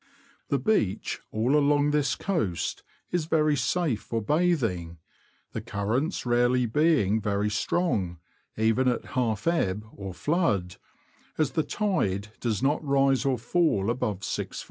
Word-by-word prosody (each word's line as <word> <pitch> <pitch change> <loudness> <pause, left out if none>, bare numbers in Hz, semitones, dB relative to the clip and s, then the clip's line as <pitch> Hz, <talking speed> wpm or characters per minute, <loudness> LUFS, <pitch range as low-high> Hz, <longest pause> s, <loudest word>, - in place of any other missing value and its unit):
The 140 - +2
beach 125 - 0
all 120 +6 +1
along 145 0 +3
this 150 -1 +1
coast 160 - -2 0.3
is 175 -3 0
very 155 -2 +2
safe 140 -2 0
for 115 - -3
bathing, 115 - 0 0.5
the 110 - -4
currents 115 - -2
rarely 120 +1 +3
being 115 - +2
very 105 +1 0
strong, 100 - 0 0.4
even 115 +4 +2
at 125 - 0
half 115 -4 0
ebb 105 - 0
or 95 -2 -7
flood, 105 - 0 0.6
as 155 -3 +1
the 160 - +1
tide 105 - -1
does 115 0 -1
not 145 +4 +1
rise 135 -2 +2
or 135 -2 +2
fall 115 - +1
above 105 -5 -2
6ft. - - -4
125 Hz, 135 wpm, -27 LUFS, 105-150 Hz, 0.6 s, along